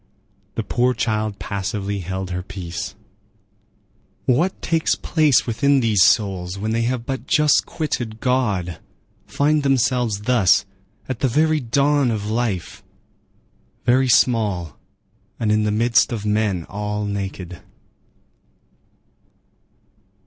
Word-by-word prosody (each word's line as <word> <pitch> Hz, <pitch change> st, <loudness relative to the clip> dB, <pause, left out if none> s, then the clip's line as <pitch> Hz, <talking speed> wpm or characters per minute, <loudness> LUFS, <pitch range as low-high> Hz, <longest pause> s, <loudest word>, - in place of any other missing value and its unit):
The -, -, -2 dB
poor 125 Hz, +1 st, +1 dB
child 110 Hz, -2 st, -1 dB
passively 100 Hz, 0 st, -3 dB
held 95 Hz, +1 st, -5 dB
her 90 Hz, 0 st, -2 dB
peace. 90 Hz, -3 st, -6 dB, 1.3 s
What 165 Hz, +10 st, +1 dB
takes 165 Hz, -1 st, +1 dB
place 155 Hz, -5 st, +2 dB
within 140 Hz, +4 st, +2 dB
these 110 Hz, -6 st, +2 dB
souls 95 Hz, -4 st, +2 dB
when 110 Hz, +3 st, -3 dB
they 115 Hz, +1 st, 0 dB
have 125 Hz, -2 st, -3 dB
but 135 Hz, 0 st, -4 dB
just 150 Hz, -5 st, +3 dB
quitted 120 Hz, -8 st, -3 dB
God, 105 Hz, -10 st, 0 dB, 0.5 s
find 150 Hz, +1 st, +1 dB
themselves 125 Hz, -5 st, +1 dB
thus, 110 Hz, -6 st, +3 dB, 0.4 s
at 130 Hz, -3 st, -4 dB
the 135 Hz, -, +2 dB
very 155 Hz, +5 st, +2 dB
dawn 140 Hz, +2 st, +2 dB
of 105 Hz, -2 st, -2 dB
life, 110 Hz, -6 st, -2 dB, 1.0 s
very 130 Hz, +1 st, +3 dB
small 105 Hz, -8 st, +2 dB, 0.6 s
and 110 Hz, -2 st, 0 dB
in 105 Hz, 0 st, +2 dB
the 105 Hz, -, +1 dB
midst 115 Hz, +4 st, +3 dB
of 110 Hz, -3 st, -4 dB
men 105 Hz, -5 st, 0 dB
all 105 Hz, +1 st, -3 dB
naked! 95 Hz, -3 st, -5 dB
110 Hz, 115 wpm, -21 LUFS, 100-130 Hz, 1.3 s, just